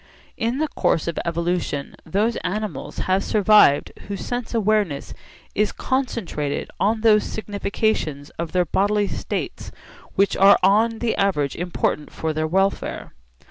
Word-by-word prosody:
In 230 +3 -1
the 310 +2 0
course 165 - 0
of 170 - -2
evolution 170 -4 -2
those 210 +7 +1
animals 205 -6 -4
have 190 +1 +2
survived 210 -8 +4 0.2
whose 200 -1 -5
sense 245 -1 -3
awareness 210 -9 0 0.4
is 210 0 +1
concentrated 230 - -2
on 215 +2 +1
those 215 -2 +5
significations 200 -8 -2
of 170 -1 -3
their 180 -1 +2
bodily 205 +4 +1
states - - -4 0.4
which 200 0 +2
are 195 +1 +7
on 220 +4 +4
the 235 0 -1
average 150 -9 +1
important 170 -3 -2
for 160 -1 -3
their 155 +1 -1
welfare. 195 +4 -1
200 Hz, 135 wpm, -22 LUFS, 170-215 Hz, 0.4 s, are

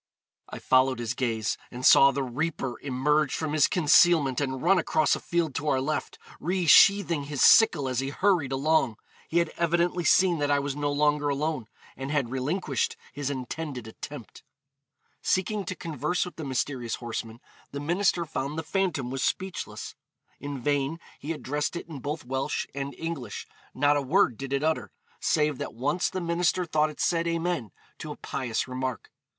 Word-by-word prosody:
I - - -7
followed 130 0 +3
his 120 0 -2
gaze, 115 -4 -1
and 125 +1 -6
saw 135 - +8
the 140 0 -1
reaper 130 0 -3
emerge 145 +2 +1
from 155 -2 -3
his 155 -3 +4
concealment 155 -4 +4
and 130 -2 -2
run 185 +2 +4
across 155 -2 +2
a - - -5
field 170 -4 -1
to 145 +4 -3
our 135 -3 +2
left, 150 +4 -3 0.2
resheathing 175 -2 +5
his 145 -2 -1
sickle 220 - +6
as 130 -2 -1
he 135 0 -2
hurried 175 -3 +1
along. 135 -4 +1 0.3
He 170 - -1
had 170 -2 +2
evidently 175 +1 +1
seen 175 +2 +4
that 145 0 0
I 145 - +4
was 140 -1 -2
no 145 0 -1
longer 145 0 +2
alone, 145 -4 -2 0.3
and 135 +1 -6
had 140 -5 0
relinquished 135 - -1 0.2
his 145 -1 -3
intended 135 -1 -5
attempt.' 115 +1 -9 0.8
Seeking 195 +2 0
to 185 - -4
converse 165 +2 -2
with 180 - -9
the 160 - -6
mysterious 130 -2 -2
horseman, 115 -1 -6 0.3
the 140 - -6
minister 175 +3 +1
found 150 -1 -4
the 160 - -2
phantom 160 -7 -1
was 135 0 -3
speechless. 190 -1 -3 0.5
In 145 -1 -5
vain 145 +4 -1 0.2
he 150 - -5
addressed 150 0 -2
it 170 - -6
in 155 -5 -8
both 145 +1 -5
Welsh 130 +2 -2
and 140 0 -5
English; 155 -10 -5 0.3
not 145 +2 +3
a - - 0
word 140 - +2
did 135 +3 -7
it 140 +1 0
utter, 160 0 0 0.3
save 150 -3 +1
that - - -5
once 145 +9 0
the 185 - -4
minister 170 +1 +1
thought 155 -1 +1
it 150 - -12
said 170 -1 +1
'Amen,' 170 -7 -1 0.3
to - - -6
a - - -8
pious 125 -3 -3
remark. 130 -1 -4
145 Hz, 175 wpm, -27 LUFS, 130-165 Hz, 0.8 s, saw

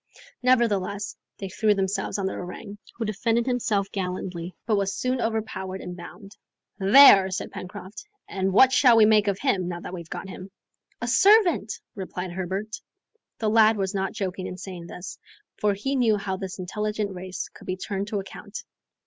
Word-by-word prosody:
Nevertheless, 210 -5 +1 0.2
they 195 - -5
threw 210 +2 +2
themselves 195 +1 -1
on 195 - -2
the 190 - -1
orang, 200 +3 -8 0.2
who 230 - -3
defended 225 +3 0
himself 215 -6 0
gallantly, 180 -2 -4
but 220 - +2
was 195 -1 0
soon 255 +2 -1
overpowered 205 -4 -3
and 180 -1 -7
bound. 195 +3 -11 0.4
"There!" 195 -2 +8
said 190 +3 -4
Pencroft. 200 - -8 0.2
"And 190 0 -1
what 260 +7 +6
shall 245 -4 +6
we 220 - +7
make 210 -1 +4
of 200 -2 +1
him, 195 -8 0
now 175 -1 -4
we've 170 -3 -8
got - - -6
him?" 185 0 -9 0.5
"A 240 - -2
servant!" 360 - +4
replied 185 -2 -5
Herbert. 190 +4 -4 0.6
The 220 - 0
lad 220 0 +5
was 195 0 -1
not 195 -1 -2
joking 190 -3 -4
in 180 - -7
saying 180 -3 -8
this, 180 +1 -8 0.4
for 205 -1 +2
he 270 +8 -2
knew 230 -5 +3
how 195 -1 -3
this 190 -1 -6
intelligent 210 +2 -3
race 185 0 -6
could - - -15
be 185 0 -2
turned 195 +1 -4
to 210 -2 -2
account. 195 - -8
200 Hz, 175 wpm, -25 LUFS, 185-220 Hz, 0.6 s, There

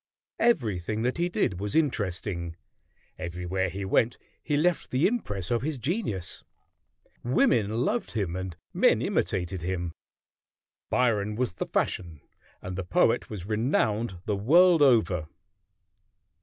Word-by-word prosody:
Everything 110 - +1
that 125 +7 -1
he 175 +1 +1
did 95 - 0
was 105 0 -3
interesting; 95 - -1 0.6
everywhere 90 +2 -2
he 95 +3 -5
went 115 +4 +2 0.2
he 145 - 0
left 175 +3 +1
the 130 +5 +2
impress 105 - -1
of 120 -2 +2
his 150 +1 -2
genius. 125 - -3 0.8
Women 115 -2 +2
loved 240 - -1
him, 100 -6 -1
and 95 -2 -5 0.2
men - - +3
imitated 90 0 -1
him. 85 -1 -3 1.0
Byron 105 -3 +1
was 125 -5 -1
the - - -4
fashion, 85 -4 -2 0.4
and 90 0 -5
the 95 - -3
poet 90 - +2
was 95 -5 -6
renowned 110 -2 0
the 105 - 0
world 165 - +5
over. 110 - +4
105 Hz, 130 wpm, -27 LUFS, 90-125 Hz, 1.0 s, world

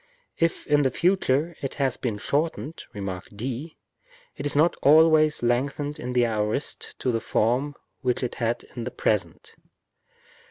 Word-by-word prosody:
Ifin 155 -3 +2
the 135 - +3
future 170 -1 +1
it 135 - -4
has 135 -3 +1
been 115 -5 -3
shortened 150 +6 -2
(Rem. 95 -4 -5
d), 130 +8 -5 0.6
it - - -3
is 145 - -2
not 160 +4 +4
always 155 -1 +5
lengthened 140 +5 0
in 125 +1 -4
the 125 -1 +4
aorist 110 +4 -2
to 125 - +1
the 115 - 0
form 125 +8 +1 0.2
which 125 -1 -1
it 125 - -2
had 115 0 0
in 120 - -4
the - - -2
present. 105 -4 -2
135 Hz, 150 wpm, -25 LUFS, 120-150 Hz, 0.6 s, always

